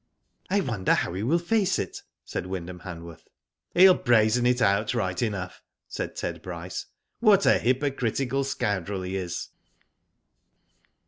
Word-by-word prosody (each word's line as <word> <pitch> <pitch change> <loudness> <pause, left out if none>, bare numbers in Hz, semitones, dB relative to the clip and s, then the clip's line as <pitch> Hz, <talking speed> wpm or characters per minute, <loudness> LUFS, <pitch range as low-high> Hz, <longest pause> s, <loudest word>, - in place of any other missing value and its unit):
"I 200 +2 +2
wonder 115 - +1
how - - -1
he 95 - -3
will 135 +10 +2
face 190 +3 +1
it?" 95 - -4 0.2
said 90 - -4
Wynd 95 -2 -4
ham 90 -1 -8
Han 85 -3 -8
worth. 85 -1 -12 0.2
" - - -50
He'll 185 +1 +8
brazen 120 -3 +3
it 125 0 +2
out 100 -1 +2
right 90 -1 -1
enough," 100 -6 -3 0.3
said - - -5
Ted - - -4
Bryce. 90 0 -6 0.3
"What 210 -4 +5
a - - +5
hypocritical 135 0 0
scoundrel 100 -7 -2
he 90 +1 -4
is." 90 -3 -4
110 Hz, 150 wpm, -26 LUFS, 90-135 Hz, 0.3 s, He'll